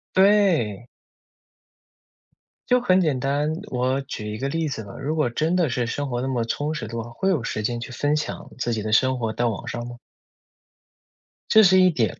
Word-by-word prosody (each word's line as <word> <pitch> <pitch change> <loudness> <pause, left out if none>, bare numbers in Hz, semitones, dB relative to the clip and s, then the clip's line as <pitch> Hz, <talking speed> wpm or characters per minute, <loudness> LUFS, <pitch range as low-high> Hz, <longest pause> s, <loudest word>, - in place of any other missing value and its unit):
对。 185 - +3 1.8
就 250 0 +5
很 190 -5 +4
简 150 -7 +1
单， 145 +3 0 0.2
我 130 +2 0
举 105 -5 -6
一 105 - -5
个 135 - -2
例 160 +3 -1
子 125 -6 -4
吧， 100 - -11
如 150 +3 -2
果 150 -7 +1
真 160 +7 0
的 175 -5 +2
是 125 -1 -1
生 145 +3 -3
活 120 -2 -2
那 130 - -2
么 125 -3 -1
充 145 +6 -2
实 115 -8 -5
的 115 +1 -4
话， 115 - -9
会 120 +11 -3
有 145 -10 0
时 110 - -3
间 120 +2 -1
去 120 - -7
分 145 +4 0
享 150 - -4
自 120 -1 -1
己 110 - -3
的 110 0 -2
生 130 +3 +3
活 115 -3 -2
到 120 +1 0
网 105 - -6
上 120 0 -4
吗？ 120 0 -9 1.5
这 220 - +7
是 185 -1 +6
一 185 - +6
点。 120 - -1
130 Hz, 220 characters per minute, -23 LUFS, 120-155 Hz, 1.8 s, 这